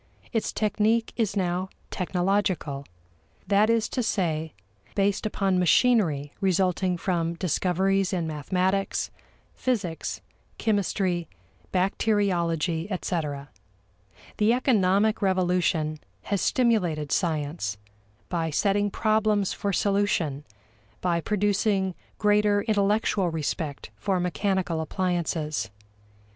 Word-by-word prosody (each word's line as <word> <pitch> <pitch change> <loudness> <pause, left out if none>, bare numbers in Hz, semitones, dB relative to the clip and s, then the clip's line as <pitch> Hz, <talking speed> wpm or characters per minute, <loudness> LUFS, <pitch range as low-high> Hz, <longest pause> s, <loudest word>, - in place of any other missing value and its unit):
Its 225 - 0
technique 215 +2 +1
is 220 -4 0
now 185 0 0 0.2
technological: 180 -6 0 0.6
that 205 +2 +3
is 230 -1 +2
to 255 - -2
say, 160 -8 -1 0.4
based 200 +1 +1
upon 195 -3 +1
machinery 175 - +3
resulting 185 -1 +1
from 170 -2 -1
discoveries 190 +3 +1
in 175 -4 -1
mathematics, 185 +6 -1 0.4
physics, 205 -11 -2 0.4
chemistry, 190 -5 0 0.4
bacteriology, 180 -3 +1
etc. 150 -6 -3 0.9
The 215 +2 +4
economic 215 -4 +2
revolution 180 -5 +1 0.2
has 200 -2 -1
stimulated 180 - +1
science 150 - -1 0.5
by 165 -2 -1
setting 205 +6 +1
problems 215 -1 +1
for 200 - -2
solution, 185 -8 0 0.6
by 170 -2 +1
producing 205 -1 +1 0.2
greater 210 -1 +3
intellectual 205 -3 +1
respect 155 -2 -3
for 195 -3 0
mechanical 180 -2 0
appliances. 160 - -1
185 Hz, 90 wpm, -26 LUFS, 165-205 Hz, 0.9 s, The